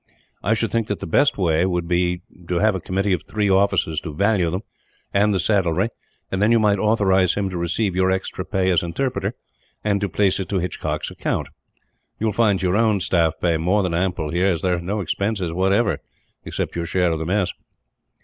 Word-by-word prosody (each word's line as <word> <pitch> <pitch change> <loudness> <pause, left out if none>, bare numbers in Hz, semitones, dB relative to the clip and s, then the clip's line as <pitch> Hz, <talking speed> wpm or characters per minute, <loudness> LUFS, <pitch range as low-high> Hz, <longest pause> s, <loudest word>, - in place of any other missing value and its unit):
I 105 +5 +2
should 115 +1 -1
think 115 -2 0
that 100 - -3
the - - -5
best 140 - +2
way 85 -3 +2
would 90 -2 -1
be 90 0 0 0.2
to 90 - -1
have 110 +3 +3
a 95 - -2
committee 95 +2 0
of 90 - -1
three 105 -2 0
officers 95 -5 +2
to 80 -4 -7
value 100 -1 +2
them, 90 +4 -2 0.5
and 105 +1 +3
the 100 - +1
saddlery; 95 +1 +1 0.4
and 95 - -1
then 105 +2 +4
you 115 - +5
might 105 -3 +3
authorize 95 -4 +3
him 100 -2 -1
to 90 - -4
receive 90 +3 -1
your 95 0 +2
extra 95 0 -2
pay 95 -1 0
as 90 - +3
interpreter, 120 +10 -2 0.5
and 100 -1 +1
to 100 - -1
place 100 +2 +1
it 95 - -4
to 100 - 0
Hitchcock's 90 -2 -3
account. - - -2 0.7
You 110 - -2
will 110 - +1
find 105 -3 +2
your 90 +1 +2
own 110 -2 +3
staff 85 -3 +2
pay 85 -2 +1
more 95 +6 +1
than 90 -2 -1
ample, 85 -3 -1
here; 90 +3 +2
as 85 -4 0
there 90 -1 +2
are - - -5
no 100 +4 -2
expenses, 100 0 -2
whatever, 95 +5 +2 0.5
except - - -3
your 85 0 -2
share 90 -1 +1
of 80 - -1
the 80 - -3
mess." 95 -2 +1
95 Hz, 215 wpm, -22 LUFS, 90-105 Hz, 0.7 s, you